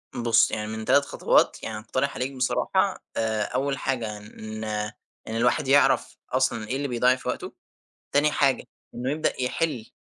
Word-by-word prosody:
بُص، 115 -1 +3
يعني 105 -1 -3
من 110 0 -5
تلت 140 +4 +4
خطوات، - - +2
يعني 110 -1 -4
أقترح 130 +5 -2
عليك 130 +2 -2
بصراحة، 130 -1 0
آآ، 110 -1 +1
أوّل 135 +4 -1
حاجة، 115 -6 -2
إن 110 +1 -8 0.6
إن 110 - -4
الواحد 125 +5 +2
يعرف 140 +2 +3
أصلًا 125 -4 +1
إيه 130 - -2
اللي 140 +1 -1
بيضيَّع 125 0 +3
في 130 - -10
وقته. - - -4 0.6
تاني 145 +2 +4
حاجة 135 -2 +2 0.3
إنّه 125 +2 -2
يبدأ 150 -3 -1
يحل، 125 -2 -1
125 Hz, 160 wpm, -26 LUFS, 110-135 Hz, 0.6 s, تلت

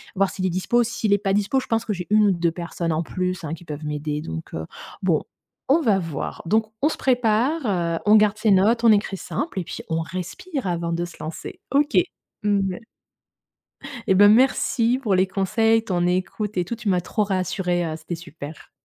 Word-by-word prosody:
voir 195 0 +2
s'il 190 -2 -4
est 185 - +2
dispo. 190 +7 +1
S'il 220 -2 0
est - - +5
pas 195 -1 -1
dispo, 210 +6 +2
je - - -7
pense 225 0 0
que 215 - -1
j'ai 180 -2 -6
1 210 0 +5
ou - - +4
2 170 -2 +1
personnes 170 0 -3
en 155 - 0
plus, 180 +2 -3
hein, 160 0 -4
qui 170 - -8
peuvent 150 -1 -6
m'aider. 150 0 -3
Donc 80 - -7
heu, 80 0 -4 0.4
bon, - - +1 0.5
on 305 +5 +5
va 215 -9 +3
voir. 165 -4 -5
Donc 220 +5 +2
on 295 - +4
se - - -4
prépare, 250 +4 +1
heu, 170 -5 0
on 210 +1 +6
garde 210 0 +3
ses 215 -1 +2
notes, 215 +5 +4
on 230 - +7
écrit 205 -2 +1
simple 285 - -4
et - - -2
puis - - -7
on 165 0 0
respire 195 - -5
avant 170 -1 -1
de 170 +1 -1
se 175 - -11
lancer. 155 +1 -7
OK. 290 +3 +2 0.5
Mmh 200 -2 +1
ouais. 180 - -7 1.3
Eh, - - +5
ben, 205 +2 +7
merci 250 0 +3
pour 210 -7 +1
les 185 +1 +3
conseils, 225 +4 +2
ton 180 -5 0
écoute 185 +3 -2
et 180 - +1
tout. 235 - -4
Tu 225 -2 -3
m'as 180 -2 +2
trop 210 +5 -1
rassurée, 185 -2 -1
heu, 155 - -3
c'était 160 +2 -6
super. 160 -2 -10
190 Hz, 215 wpm, -23 LUFS, 170-220 Hz, 1.3 s, on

